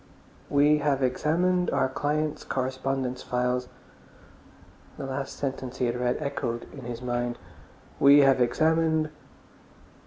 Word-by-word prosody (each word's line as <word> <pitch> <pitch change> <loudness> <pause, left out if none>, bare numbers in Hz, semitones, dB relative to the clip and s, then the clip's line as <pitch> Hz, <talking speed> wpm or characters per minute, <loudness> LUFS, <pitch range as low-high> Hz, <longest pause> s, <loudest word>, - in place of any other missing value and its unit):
"We 145 +1 +4
have 140 -2 +1
examined 175 +7 +1
our - - +1
client's 150 +3 -2
correspondence 130 -1 -2
files...." 125 0 -1 1.3
The - - -5
last 135 0 -4
sentence 130 -2 -4
he 125 - 0
had 120 0 -1
read 125 0 0
echoed 140 -5 -3
in 135 -4 -9
his 120 0 -6
mind. 120 -1 -2 0.6
"We 140 +1 +7
have 135 -2 +4
examined...." 160 +4 +2
135 Hz, 120 wpm, -27 LUFS, 125-150 Hz, 1.3 s, We